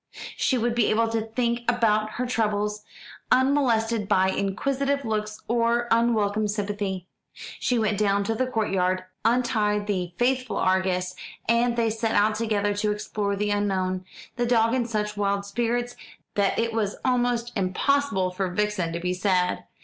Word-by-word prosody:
She 260 - +1
would 240 0 0
be 235 -3 +2
able 225 +1 +2
to 225 0 0
think 235 +1 0
about 215 -3 +2
her 250 - -2
troubles, 210 -3 -1 0.5
unmolested 235 -5 +2
by 190 -2 +3
inquisitive 275 +9 -1
looks 215 -1 -2
or 235 +1 +1
unwelcome 215 -2 +2
sympathy. 205 -3 -3 0.5
She 250 - +1
went 215 -2 0
down 200 -1 +2
to 225 +3 -1
the 255 +3 0
court 225 -4 -1
yard, 185 -1 +1 0.2
untied 220 -4 +1
the 180 -4 -2
faithful 255 0 0
Argus, 185 -1 +1 0.3
and 235 +1 +2
they 230 -1 +2
set 225 0 -1
out 210 +1 +4
together 210 -2 0
to 210 0 +1
explore 210 -1 -2
the 205 +1 -1
unknown, 190 -2 0 0.3
the 240 0 0
dog 230 -1 +3
in 250 -2 0
such 210 -2 -2
wild 200 0 0
spirits 240 +3 -1 0.4
that 200 -1 +1
it 230 0 0
was 210 -3 -1
almost 245 -1 +1
impossible 190 +1 +1
for 185 +1 -2
Vixen 210 -2 -1
to 170 - -2
be 180 +1 -1
sad. 180 -1 0
215 Hz, 155 wpm, -25 LUFS, 200-235 Hz, 0.5 s, out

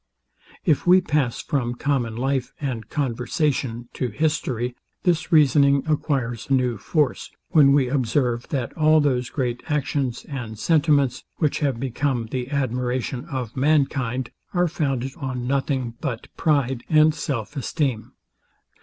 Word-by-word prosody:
If 155 0 +2
we 180 +1 +8
pass 150 -8 0
from 120 -4 -1
common 125 -4 -1
life 135 0 -1
and 120 -7 -4
conversation 125 -2 -1
to 130 - -2
history, 125 -2 -1 0.3
this 175 -2 +1
reasoning 140 -3 +5
acquires 135 -7 -1
new 125 -5 +1
force, 150 - 0 0.2
when 145 -4 +6
we 140 -2 +4
observe, 125 -2 0
that 130 -5 -3
all 155 0 +5
those 125 -4 +1
great 125 -3 -2
actions 140 -4 -1
and 120 -6 -6
sentiments, 145 -3 +2
which 150 -4 +1
have 135 -6 0
become 125 -2 -1
the 125 0 -3
admiration 125 -1 -1
of 130 -7 -5
mankind, 135 -3 +1 0.2
are 175 0 +3
founded 135 -5 -1
on 125 -3 -4
nothing 130 -2 -1
but 125 -6 -5
pride 135 -5 +1
and 155 0 +5
self 140 -4 -4
esteem. 135 -4 -2
135 Hz, 130 wpm, -23 LUFS, 125-150 Hz, 0.3 s, we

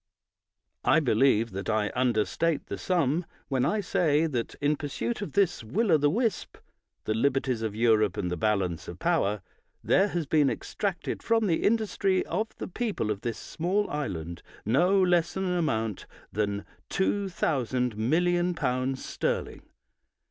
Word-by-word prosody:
I - - +5
believe 115 -4 +3
that 95 +3 -5
I 110 -1 +1
understate 125 +6 +1
the - - -6
sum 170 -2 +1 0.3
when 130 -3 +1
I 215 0 +1
say 165 -4 +2
that, 125 -7 -3
in 145 +1 +1
pursuit 150 +11 -3
of 205 - -5
this 190 -9 +2
will 195 - 0
o' 160 - +7
the 145 0 +3
wisp 225 - -1 0.5
(the 110 - -1
liberties 130 0 +1
of 110 -2 -3
Europe 110 -4 +3
and 90 -3 -2
the - - 0
balance 95 -2 -1
of - - -7
power), 100 -1 0 0.4
there 195 - +4
has 175 -5 -2
been 145 -1 +3
extracted 180 - -3
from 225 -1 +2
the 170 -5 +1
industry 205 -3 +1
of 220 - -1
the - - -5
people 205 - -2
of 100 -1 -4
this 115 -1 -3
small 190 +5 -1
island 85 - -4 0.2
no 175 - +3
less 175 -1 +2
an 190 - -1
amount 115 - -1 0.3
than 100 -1 -1 0.2
2,000,000,000L 145 - 0
sterling. - - -3
145 Hz, 145 wpm, -28 LUFS, 110-180 Hz, 0.5 s, o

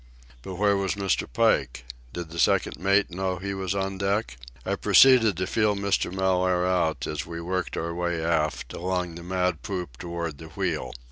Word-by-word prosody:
But 95 +8 -7
where 100 +2 +3
was 100 0 -1
Mr. 100 -9 -1
Pike? 60 +1 +1 0.3
Did 85 +1 -6
the 85 - -6
second - - +2
mate 100 +2 +2
know 95 +1 -2
he 100 +2 -4
was 95 -1 -2
on 95 -1 -2
deck? 100 - -1 0.3
I - - 0
proceeded 120 -8 +6
to 90 - -1
feel 105 +1 +1
Mr. 100 -2 0
Mellaire 90 -1 +1
out 80 -7 0
as 75 0 -4
we 85 0 -6
worked 90 +2 -3
our 85 0 -2
way 85 -1 -1
aft, 80 -6 -1
along 90 -1 -2
the 85 - -9
mad 90 -2 -1
poop 90 -10 -5
toward 85 -3 -5
the 80 - -9
wheel. 85 -1 -3
90 Hz, 185 wpm, -26 LUFS, 85-95 Hz, 0.3 s, proceeded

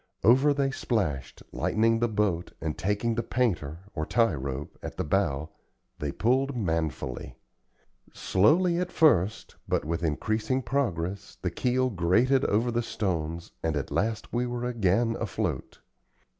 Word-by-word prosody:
Over 130 +5 +6
they 140 -1 +1
splashed, 85 - -2
lightening 115 +1 +2
the 120 - +2
boat, 100 -6 -1
and 80 -2 -3
taking 105 +4 0
the 115 - 0
"painter," 90 - -1
or 80 - -2
tie 115 +6 +2
rope, 70 0 -5
at - - -7
the - - 0
bow, 80 -4 0 0.5
they 75 -1 -2
pulled 130 - +1
manfully. 80 - -2 0.8
Slowly 170 - +3
at 180 0 -2
first, 110 - +2
but - - 0
with 85 +2 -2
increasing 110 - 0
progress, 100 -8 -2
the 90 - 0
keel 130 +5 +1
grated 115 +9 +3
over 115 +4 +2
the 120 0 +1
stones, 85 -7 -3
and 80 -2 0
at 70 - -4
last 110 +1 -1
we 120 +1 +1
were 120 0 -3
again 115 -1 +1
afloat. 95 - -3
105 Hz, 145 wpm, -28 LUFS, 85-120 Hz, 0.8 s, Over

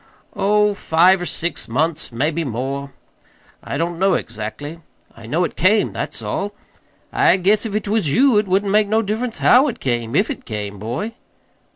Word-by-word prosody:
"Oh, 210 +1 +2
five 185 0 +3
or 175 - -3
six 170 +1 -3
months 155 +6 -1
maybe 150 +7 -1
more. 135 +2 -4 0.7
I - - -4
don't 170 +2 -2
know 190 -1 +3
exactly. 115 +9 -6 0.4
I 115 -1 -12
know 160 +9 +1
it - - -3
came, 205 +4 +3
that's - - -4
all. 205 +1 -3 0.6
I 395 - +4
guess 205 +5 +2
if 205 - -7
't 210 -1 -2
was 205 -8 +1
you 250 - +4
it 210 - -2
wouldn't 195 +2 +1
make 210 0 +3
no 220 +2 +2
difference 225 +3 -3
HOW 260 +4 +5
it 245 - -4
came, 120 -1 -2
if 205 - +2
it 275 - -7
came, 105 -2 -5
boy." 125 - -4
180 Hz, 180 wpm, -20 LUFS, 140-210 Hz, 0.7 s, HOW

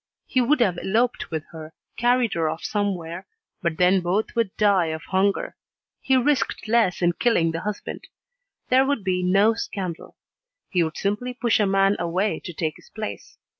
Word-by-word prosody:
He 255 - +1
would 260 +2 +2
have 185 -7 +2
eloped 235 +5 0
with 160 -2 -3
her, 160 -1 -10 0.2
carried 245 -1 +2
her 165 -2 0
off 160 - -5
somewhere, 185 -4 -3 0.3
but 170 -3 -1
then 180 +1 +4
both 185 +5 -1
would 230 -3 +1
die 200 -5 +3
of 160 0 -4
hunger. 195 +1 0 0.5
He 265 - +2
risked 255 -4 0
less 220 -6 +2
in 175 0 +3
killing 170 -6 +2
the 165 - -3
husband. 210 +1 -5 0.6
There 260 +1 +5
would 275 -5 -1
be 185 -1 0
no 195 +5 +4
scandal. 190 -6 -5 0.6
He 180 - +2
would 160 -1 -4
simply 210 +5 -2
push 240 -3 +1
a 205 - +3
man 195 +1 +3
away 180 +5 0
to 180 - -5
take 160 -2 -3
his - - -19
place. - - -7
195 Hz, 175 wpm, -24 LUFS, 175-230 Hz, 0.6 s, There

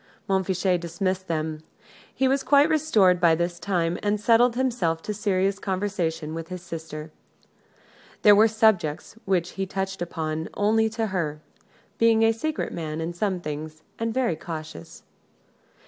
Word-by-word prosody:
Montfichet 190 -1 +1
dismissed 185 +2 -2
them. 155 -1 -2 0.5
He 265 - +1
was 270 +1 +2
quite 285 +2 +4
restored 220 - +3
by 165 -2 +5
this 175 +1 -2
time, 175 -2 -1
and 205 0 0
settled 235 +2 +4
himself 230 -11 0
to - - -3
a - - -2
serious 195 -1 0
conversation 185 -6 -2
with 165 0 -5
his 180 -1 -7
sister. 160 -2 -7 1.1
There 210 - +8
were 215 +2 +6
subjects 215 -10 +1
which 180 -2 0
he 195 0 -4
touched 190 -1 -4
upon 160 -2 -3
only 220 +2 +2
to 225 +1 -2
her 155 -5 -2 0.6
being 225 -1 +4
a 225 - +5
secret 305 +8 -3
man 155 -2 -4
in 165 +1 -3
some 185 0 -1
things, 155 0 -6 0.2
and 230 0 -1
very 240 -8 0
cautious. 155 - -8
185 Hz, 150 wpm, -25 LUFS, 165-220 Hz, 1.1 s, There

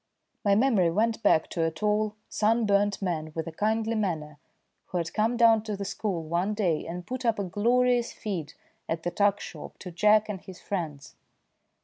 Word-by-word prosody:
My 200 -2 +4
memory 215 -7 +3
went 220 +6 +1
back 165 -7 +4
to 165 - -1
a 165 - +2
tall, 210 +5 0
sunburnt 205 -2 +2
man 160 -4 -2
with 160 - -2
a 165 - -5
kindly 220 +5 0
manner 160 -9 -2 0.5
who 180 - -3
had 165 -1 -3
come 225 +3 +1
down 230 -2 +6
to 210 -2 -3
the 200 - -4
school 190 -3 -2
one 175 +6 -1
day 175 -7 0
and 175 +1 -6
put 255 +1 -5
up 230 -2 +2
a 200 - -1
glorious 240 +5 +2
feed 175 -8 -5 0.4
at 165 0 -2
the 175 - -1
tuck 200 +2 +2
shop - - -9
to 180 - -8
Jack 210 +4 +4
and 200 -4 -5
his 185 -2 -11
friends. 155 -8 -5
200 Hz, 190 wpm, -27 LUFS, 170-220 Hz, 0.5 s, down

